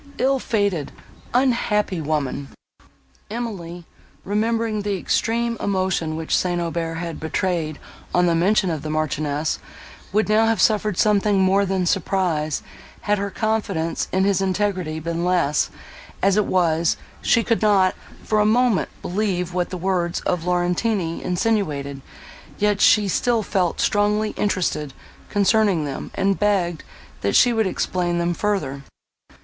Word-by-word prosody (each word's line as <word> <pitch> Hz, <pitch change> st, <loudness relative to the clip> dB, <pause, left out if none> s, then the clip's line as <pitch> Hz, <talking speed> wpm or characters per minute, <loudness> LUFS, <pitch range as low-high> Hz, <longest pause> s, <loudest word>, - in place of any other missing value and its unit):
Ill 270 Hz, +1 st, +2 dB
fated, 200 Hz, -, -1 dB, 0.4 s
unhappy 230 Hz, -7 st, +1 dB
woman!" 145 Hz, -2 st, -2 dB, 0.8 s
Emily, 190 Hz, -7 st, -5 dB, 0.4 s
remembering 220 Hz, +1 st, 0 dB
the 200 Hz, -1 st, -1 dB
extreme 230 Hz, +5 st, 0 dB
emotion 185 Hz, -5 st, -1 dB
which 160 Hz, 0 st, -1 dB
St. 175 Hz, -1 st, 0 dB
Aubert 165 Hz, -1 st, -2 dB
had 165 Hz, -1 st, -5 dB
betrayed 160 Hz, -1 st, -1 dB, 0.3 s
on 180 Hz, 0 st, +3 dB
the 170 Hz, -, +3 dB
mention 185 Hz, +2 st, +2 dB
of 155 Hz, -3 st, -3 dB
the 155 Hz, -, -5 dB
Marchioness, 155 Hz, 0 st, -1 dB, 0.5 s
would 215 Hz, +3 st, +2 dB
now 215 Hz, +1 st, +4 dB
have 225 Hz, -3 st, +1 dB
suffered 210 Hz, -2 st, +2 dB
something 205 Hz, -1 st, +3 dB
more 195 Hz, +1 st, +3 dB
than 185 Hz, -1 st, 0 dB
surprise, 170 Hz, -5 st, 0 dB, 0.4 s
had 210 Hz, -1 st, +1 dB
her 200 Hz, 0 st, -2 dB
confidence 200 Hz, -7 st, -1 dB
in 190 Hz, +1 st, +2 dB
his 195 Hz, -1 st, +2 dB
integrity 185 Hz, -4 st, -1 dB
been 170 Hz, +1 st, -3 dB
less; 175 Hz, -5 st, +2 dB, 0.5 s
as 195 Hz, 0 st, +4 dB
it 210 Hz, -1 st, +2 dB
was, 170 Hz, -2 st, +2 dB, 0.2 s
she 230 Hz, -, +3 dB
could 230 Hz, 0 st, 0 dB
not, 195 Hz, -3 st, +4 dB, 0.3 s
for 215 Hz, -, +1 dB
a -, -, +4 dB
moment, 230 Hz, 0 st, +2 dB
believe 180 Hz, -2 st, -1 dB
what 180 Hz, -1 st, -1 dB
the 185 Hz, -, -5 dB
words 175 Hz, -1 st, -1 dB
of 175 Hz, -2 st, -1 dB
Laurentini 180 Hz, 0 st, 0 dB
insinuated; 155 Hz, -9 st, -1 dB, 0.6 s
yet 205 Hz, -1 st, +1 dB
she 210 Hz, -2 st, +5 dB
still 230 Hz, +4 st, +1 dB
felt 185 Hz, -4 st, 0 dB
strongly 210 Hz, +1 st, +1 dB
interested, 175 Hz, -8 st, -1 dB, 0.4 s
concerning 205 Hz, -5 st, +2 dB
them, 140 Hz, -2 st, -5 dB
and 195 Hz, 0 st, +1 dB
begged, 185 Hz, -5 st, +1 dB, 0.4 s
that -, -, 0 dB
she 245 Hz, -1 st, +5 dB
would 220 Hz, -3 st, +1 dB
explain 175 Hz, -1 st, -1 dB
them 170 Hz, 0 st, 0 dB
further. 170 Hz, -9 st, -2 dB
185 Hz, 140 wpm, -22 LUFS, 170-210 Hz, 0.8 s, she